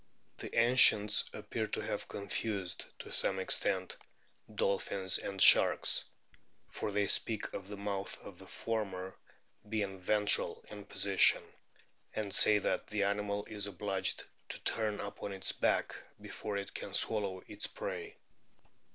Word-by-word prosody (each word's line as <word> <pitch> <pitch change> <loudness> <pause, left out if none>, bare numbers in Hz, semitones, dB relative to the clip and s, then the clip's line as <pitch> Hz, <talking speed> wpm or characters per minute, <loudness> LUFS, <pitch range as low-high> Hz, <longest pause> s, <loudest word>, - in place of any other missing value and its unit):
The - - -6
ancients 115 -3 +5
appear 105 +1 -4
to - - -3
have - - -4
confused, 100 -2 -3
to - - -10
some 95 - +1
extent, 95 - 0 0.6
dolphins 95 -2 0
and 95 -1 -5
sharks, - - +6 0.7
for 105 - -3
they 100 0 +1
speak 110 +1 0
of 95 - -6
the 105 0 -7
mouth 100 -1 -4
of - - -11
the - - -12
former 95 -5 -4 0.5
being 100 -3 -2
ventral 105 +2 +3
in 105 -1 -9
position, 100 -1 +4 0.7
and 105 -3 -3
say 105 +1 +5
that 95 - -1
the 105 -1 -1
animal 100 0 -1
is 105 -1 -4
obliged 95 0 -2 0.2
to - - -5
turn 105 -2 -1
upon 100 0 -6
its 95 -1 0
back - - 0 0.2
before 105 -2 -5
it 100 0 -5
can - - -5
swallow 100 -4 -1
its 105 0 -4
prey. 450 -4 -6
100 Hz, 135 wpm, -33 LUFS, 95-105 Hz, 0.7 s, sharks